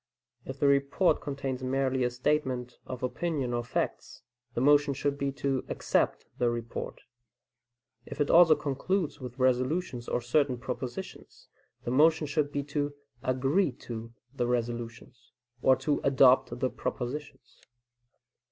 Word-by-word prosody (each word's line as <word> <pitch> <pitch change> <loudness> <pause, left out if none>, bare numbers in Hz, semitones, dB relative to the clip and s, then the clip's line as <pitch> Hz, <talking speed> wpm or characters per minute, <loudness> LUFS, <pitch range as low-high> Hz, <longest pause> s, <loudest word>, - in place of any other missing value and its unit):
If 135 +1 -7
the - - +2
report 140 +6 +3
contains 135 -3 -4
merely 130 0 0
a 125 - +2
statement 125 -1 -1
of 130 -1 -6
opinion 135 -2 -1
or 120 0 -1
facts, 120 - -3 0.3
the - - 0
motion 145 +1 +4
should 140 +1 -1
be 140 -1 -1
to 135 -1 -1
"accept" - - 0
the 120 - +3
report; 115 -1 -5 1.1
if - - -8
it 145 - +2
also 165 -2 +8
concludes 155 +4 -2
with 125 0 -7
resolutions 130 +1 0
or - - 0
certain 125 +2 +1
propositions, 125 +8 -7 0.3
the 120 - -3
motion 155 +4 +4
should 145 0 0
be 145 -1 -2
to 145 0 -2 0.3
"agree 135 +7 +1
to" 115 -2 -8 0.2
the 120 -3 -1
resolutions, 120 0 -4 0.3
or 130 - +5
to 135 +3 -1
"adopt" 130 -1 +4
the 130 - 0
propositions. 130 0 -6
130 Hz, 135 wpm, -29 LUFS, 125-145 Hz, 1.1 s, also